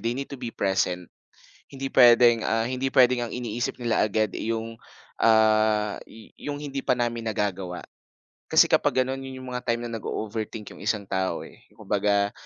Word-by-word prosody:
they 115 +3 -2
need 140 +1 -5
to 135 - -7
be 120 - -4
present. 95 -2 0 0.6
Hindi 135 -1 -6
puwedeng, 120 -2 +6
ah, 115 +1 +1
hindi 130 +1 -2
puwedeng 125 -1 +4
ang - - -9
iniisip 120 -1 -3
nila 115 -2 +1
agad, 110 0 0
eh, 115 - -2
'yong, 115 0 -6 0.4
ah, 110 -1 +3
y 110 0 -15
'yong 145 0 -5
hindi 140 -2 -4
pa - - +4
namin 120 -1 -2
nagagawa. 95 -4 -3 0.7
Kasi - - +6
kapag - - +2
gano'n, 135 +1 -4
'yon 130 -1 -8
'yong 130 - -7
mga 125 - -2
time 120 -1 -1
na - - -8
nag-o-overthink 110 0 -5
'yong - - -14
isang 105 +1 -1
tao, 95 -1 -2
eh. - - -15 0.2
Kumbaga, 100 -1 0
115 Hz, 180 wpm, -25 LUFS, 105-125 Hz, 0.7 s, puwedeng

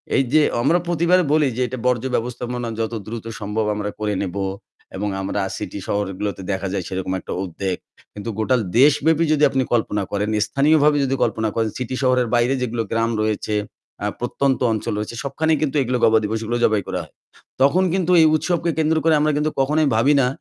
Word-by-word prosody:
এই 135 - +4
যে 155 - +6 0.2
আমরা 170 +8 +3
প্রতি 170 -1 0
এবারে 180 0 +5
বলি 155 -2 +3
যে - - 0
এটা 130 - -5
বর্জ্য 125 0 +1
ব্যবস্থাপনা 120 0 -3
যত 115 +1 -2
দ্রুত 115 0 -6
সম্ভব 105 +1 -2
আমরা 105 0 -3
করে 105 -1 -1
নেব। 95 0 -4 0.6
এবং 105 +1 -2
আমরা 100 +1 -2 0.2
সিটি 100 - -6
শহরগুলোতে 100 -1 -2
দেখা 95 0 -2
যায় 95 -3 -2
সেরকম 95 0 -3
একটা - - -9
উদ্বেগ। 95 +1 -3 0.4
কিন্তু 105 +2 -6
গোটা 125 +4 +2 0.2
দেশব্যাপী 150 +3 +4
যদি 150 0 +1
আপনি 135 -1 0
কল্পনা 105 -3 0
করেন 105 +1 -1 0.2
স্থানীয়ভাবে 145 +4 +3
যদি 135 0 0
কল্পনা 110 -1 0
করেন 110 -1 +1
সিটি 130 0 -4
শহরের 125 -2 +3
বাইরে 120 +2 +2
যেগুলো 120 -2 -1
গ্রাম 115 +1 +1
রয়েছে, 110 0 -1 0.5
আ - - 0
প্রত্যন্ত 130 +2 0
অঞ্চল 110 -1 -2
রয়েছে 105 +2 -4
সবখানেই 155 +3 0
কিন্তু 150 -1 -1
এগুলো 125 0 -1
গবা 110 0 +5
দিবস 110 +2 -1
এগুলো 120 +2 -1
জবাই 110 -2 +3
করা - - -2
হয়। - - -17 0.5
তখন 165 +8 +4
কিন্তু 180 -2 +1
এই - - +6
উৎসবকে 170 +1 0
কেন্দ্র 160 0 +2
করে 165 0 +4
আমরা 155 0 +2
কিন্তু 150 +1 0
কখনোই 150 +3 +2
ভাবি 135 +6 +4
না 125 - +2
120 Hz, 195 wpm, -21 LUFS, 105-150 Hz, 0.6 s, যে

